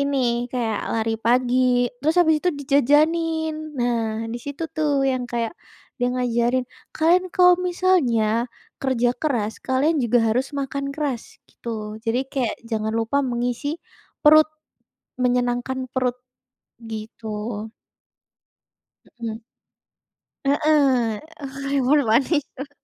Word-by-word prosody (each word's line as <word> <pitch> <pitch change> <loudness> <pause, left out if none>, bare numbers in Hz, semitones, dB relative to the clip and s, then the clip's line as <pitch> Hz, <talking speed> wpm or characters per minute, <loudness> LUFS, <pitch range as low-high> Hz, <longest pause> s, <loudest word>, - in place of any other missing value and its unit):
ini 280 0 +1 0.3
kayak 225 -4 -1
lari 225 0 0
pagi, 245 0 +3
terus 315 +5 +1
habis 320 -2 +4
itu 360 - +1
dijajanin. 310 +4 +2 0.2
Nah, 230 -2 0
di 240 - -4
situ 285 +3 -4
tuh 290 -3 +1
yang 255 -1 -1
kayak 235 +2 -1 0.5
dia 245 - +2
ngajarin, 245 0 +1 0.3
"Kalian 345 +3 +4
kalau 360 0 +7
misalnya 345 -11 +2 0.6
kerja 245 -3 +1
keras 235 -8 0
kalian 275 +5 +2
juga 240 +1 +3
harus 250 +5 +1
makan 275 +1 -3
keras," 280 -6 -2 0.3
gitu. - - -11 0.4
Jadi 235 +2 +1
kayak 250 -5 -1
jangan 220 -1 -1
lupa 230 +5 -1
mengisi 245 +3 -2 0.6
perut, 310 +1 +7 0.7
menyenangkan 245 +1 0 0.2
perut, 250 -1 0 0.6
gitu. 225 0 -8 1.9
Mmm. 225 -1 -4 1.0
Heeh, 275 -6 +3 0.2
eh, 275 - -4 0.2
keburu 280 +1 +3
panik 265 +7 +3 0.2
tuh. 275 +1 -7
255 Hz, 110 wpm, -23 LUFS, 235-290 Hz, 1.9 s, kalau